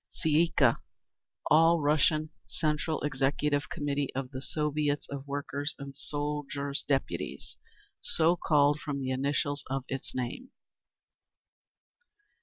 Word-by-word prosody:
Tsay 160 - -2
ee 160 +3 +5
kah. 130 -7 +3 0.7
All 165 +2 +6
Russian 155 +1 +2 0.2
Central 155 +1 0
Executive 145 0 0
Committee 145 -1 -1
of 135 -1 -3
the 130 -1 -5
Soviets 150 0 0
of 140 0 -6
Workers' 145 +1 -3
and 140 -1 -8
Soldiers' 145 -1 -3
Deputies. 135 -2 -2 0.4
So 165 +2 +3
called 150 -3 +3
from 145 -3 -3
the 130 -1 -2
initials 140 +2 0
of 135 0 -1
its 135 -1 -4
name. 130 - -4
145 Hz, 115 wpm, -30 LUFS, 140-150 Hz, 0.7 s, All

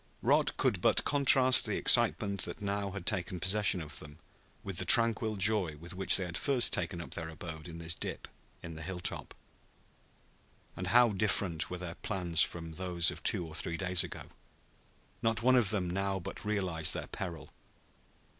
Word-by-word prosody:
Rod - - +1
could - - 0
but - - +2
contrast 135 -2 +4
the - - -2
excitement 100 -3 +3
that 85 - -6
had 105 - -9
now 100 0 -3 0.2
taken 90 0 -2
possession 100 0 +1
of 80 0 -3
them 75 -1 -11 0.5
with 95 -3 -4
the - - +3
tranquil 115 -2 +6
joy 100 -5 +2
with 85 +3 -10
which 95 +1 0
they 95 - -3
had 85 -1 -5
first 135 -4 +3
taken 85 0 -3
up 75 -6 -9
their 80 -1 -5
abode 80 0 -9
in 85 -1 -10
this 85 0 -2
dip - - -6 0.4
in 85 - -8
the 80 - -10
hilltop. 90 +2 -4 1.4
And 90 - -6
how 120 +4 +4
different 95 -5 -1
were 90 - -6
their 90 -2 -7
plans 90 -3 -1
from 85 -1 -2
those 85 0 +2
of - - -11
two 85 - -1
or 80 - -11
three 85 +1 -3
days 90 -2 +2
ago! - - -8 1.0
Not 115 0 -1
one 130 +1 +4
of 120 -6 +3
them 100 -4 0
now 95 +2 -3
but 85 - -8
realized 95 -7 0
their - - -5
peril. 85 -5 -8
90 Hz, 180 wpm, -30 LUFS, 85-105 Hz, 1.4 s, tranquil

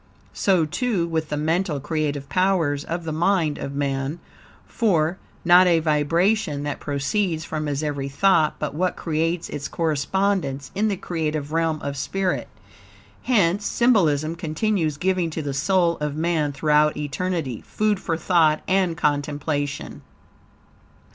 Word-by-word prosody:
So, 185 -5 +2
too, 200 +1 -1
with 160 -2 -2
the 150 - -2
mental 160 +1 0
creative 150 -1 -2
powers 170 -6 +1
of 170 +1 -4
the 160 - -4
mind 165 -1 +1
of 140 - -5
man, 140 +1 -2 0.5
for, 175 -6 +1 0.3
not 180 +1 +7
a 170 -2 +4
vibration 160 +1 +1
that 145 0 -3
proceeds 160 +4 -1
from 155 -2 -3
his 145 +1 -2
every 140 -2 -2
thought 160 +1 +3
but 150 -2 -3
what 180 +4 0
creates 165 +1 -1
its 140 -1 -5
correspondence 160 -2 -1
in 210 +3 +1
the 200 -3 -1
creative 155 -4 -3
realm 165 -1 0
of 140 0 -3
spirit. 190 +6 -1 0.7
Hence, 205 -5 +2
symbolism 165 - +2
continues 165 -1 -1
giving 180 0 0
to 160 0 -4
the 140 -1 -3
soul 170 +4 +2
of 150 -1 -3
man, 160 -2 0
throughout 150 +2 +2
eternity, 150 -3 -3
food 210 -2 0
for 165 -4 -2
thought 160 -3 +3
and 185 -3 +1
contemplation. 145 0 -2
160 Hz, 140 wpm, -23 LUFS, 145-185 Hz, 0.7 s, not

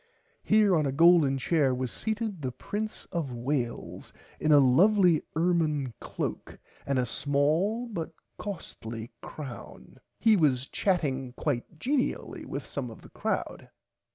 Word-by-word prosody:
Here 210 -3 +4
on 155 -3 +2
a - - 0
golden 160 -2 +5
chair 135 -1 +2
was 125 -1 -3
seated 220 -5 -3
the 130 -2 -2
prince 215 - -5
of 165 -7 -2
Wales 120 0 -3 0.3
in 155 - +2
a 150 - +8
lovely 170 +5 +5
ermine 155 -6 +1
cloak - - -5 0.3
and 140 -1 +1
a 125 - +2
small 150 - +1
but 175 -8 -4 0.3
costly 115 - -6
crown. 130 - -9 0.2
He 225 -2 +5
was 135 -7 +2
chatting 135 -9 0
quite 145 +3 -3
genially 260 - -1
with - - -5
some - - -4
of - - -12
the - - -13
crowd. - - -3
150 Hz, 135 wpm, -28 LUFS, 130-185 Hz, 0.3 s, a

